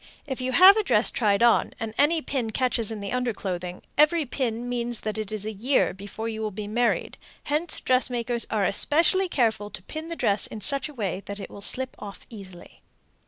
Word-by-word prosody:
If 265 -3 -5
you 255 0 -2
have 375 - +8
a 435 - +2
dress - - +2
tried 210 -2 +1
on, 235 -1 +3
and 220 -1 -4
any 310 +4 +2
pin 255 -5 -2
catches 240 -1 0
in 215 -2 -6
the 200 - -5
underclothing, 190 -8 -3 0.2
every 305 +1 +4
pin 245 -2 -3
means 240 -1 -1
that 215 -1 -3
it 215 -1 -4
is 215 -1 -4
a 215 - -3
year 240 +7 +1
before 205 +3 -7
you 220 -1 -4
will 215 - -1
be 210 +1 -6
married; 230 +3 -1 0.2
hence 305 +4 0
dressmakers 245 -2 +1
are 210 -3 0
especially 335 - +2
careful 220 -8 0
to 185 - -9
pin 310 - -7
the 335 - -5
dress 200 -9 0
in 220 - -8
such 275 +8 +3
a - - -11
way 195 -5 -3
that 200 0 -6
it 195 - -8
will 200 - -10
slip 260 +5 -1
off 200 -1 -9
easily. 190 -5 -12
230 Hz, 210 wpm, -25 LUFS, 205-265 Hz, 0.2 s, have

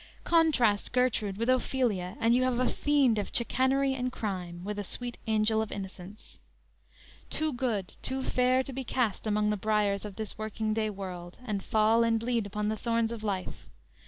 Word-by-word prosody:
Contrast 280 -11 +3
Gertrude 225 -6 +1
with 230 +2 -1
Ophelia, 240 -6 0
and 230 -1 +3
you 250 - +4
have 255 -1 +1
a 255 - +2
fiend 275 -7 +2
of 205 - -3
chicanery 265 +3 +2
and 255 -1 -2
crime, 180 -6 -4
with 205 +1 -4
a - - -2
sweet 240 +4 -4
angel 220 0 +3
of 220 - -4
innocence: 195 +1 -9 0.9
"Too 310 -1 0
good, 230 -7 -2
too 265 0 -1
fair 255 0 +2
to 270 - -8
be 265 +1 -3
cast 235 -4 -1
among 210 0 +2
the 210 - 0
briers 205 -1 +1
of 205 -2 -7
this 215 -1 -5
working 215 0 -2
day 215 0 0
world 185 -3 -7
and 205 -4 -2
fall 220 +2 +3
and 225 -1 +2
bleed 230 -2 -1
upon 210 +1 -2
the 215 0 -1
thorns 230 0 0
of 230 -2 -6
life. 195 -4 -4
220 Hz, 185 wpm, -29 LUFS, 205-250 Hz, 0.9 s, you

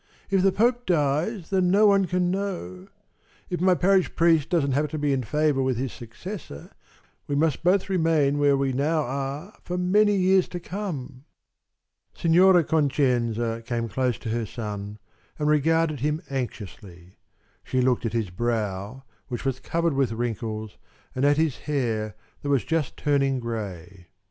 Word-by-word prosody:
"If 195 -1 +3
the 195 +1 +4
Pope 245 +4 +1
dies, 165 - 0
then 185 -2 +2
no 205 +4 +5
one 200 -2 +5
can 180 0 0
know 175 - -4 0.6
If 175 - -2
my 185 0 +4
parish 190 +1 +2
priest 165 -3 +3
doesn't 150 -6 +1
happen 145 +3 0
to 155 - -4
be 145 -1 +1
in 135 - 0
favor 150 +2 +1
with 130 -2 0
his 130 +1 -3
successor, 120 - -9 0.6
we 145 - -1
must 155 0 +1
both 185 +2 +3
remain 160 -6 +2
where 145 -1 +4
we 135 -1 0
now 155 +4 +1
are 140 - -4
for 180 - -4
many 205 +3 +3
years 190 -1 +3
to 175 - -6
come." 155 -9 -6 0.9
Signora 175 +1 +5
Concenza 125 -7 0
came 115 -1 -2
close 125 0 -1
to 115 - -6
her 115 0 -2
son 105 -2 -6 0.4
and 150 - -1
regarded 155 0 +2
him 150 +5 -1
anxiously. 100 -8 -7 0.5
She 130 - -1
looked 125 -1 +2
at 115 - -2
his 110 -6 -1
brow, 110 +2 -3 0.2
which 125 0 -5
was 135 -1 -1
covered 170 -1 -1
with 135 -4 +1
wrinkles, 110 -2 -4 0.3
and 130 +2 0
at 145 0 +4
his 160 -4 +1
hair 110 -8 -1 0.3
that 145 - -4
was 140 -3 +2
just 160 -4 -1
turning 140 -2 +1
gray. 95 -6 -6
140 Hz, 160 wpm, -25 LUFS, 120-170 Hz, 0.9 s, no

